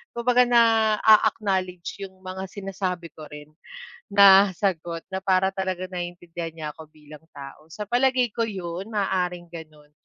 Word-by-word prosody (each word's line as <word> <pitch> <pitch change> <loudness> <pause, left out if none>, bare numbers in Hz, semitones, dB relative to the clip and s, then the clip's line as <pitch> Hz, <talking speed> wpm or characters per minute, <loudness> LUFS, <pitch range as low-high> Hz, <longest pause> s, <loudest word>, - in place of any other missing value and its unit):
Kung 235 - -5
baga 250 0 +5
naa-acknowledge 215 -5 +2
yung 190 - -25
mga 185 0 -6
sinasabi 185 -3 -5
ko 155 -1 -11
rin 150 +1 -12 0.5
na 200 -1 +6
sagot 170 -4 -2
na 190 - -3
para 190 0 +2
talaga 185 -1 -3
naiintindihan 175 -2 -6
niya 155 -2 -6
ako 160 -1 -13
bilang 150 0 -15
tao. 140 +2 -11
Sa 210 - -5
palagay 250 -1 +2
ko 230 - 0
yun, 185 -1 -6
maaaring 180 -4 -2
gano'n. 155 -2 -12
185 Hz, 145 wpm, -24 LUFS, 170-205 Hz, 0.5 s, na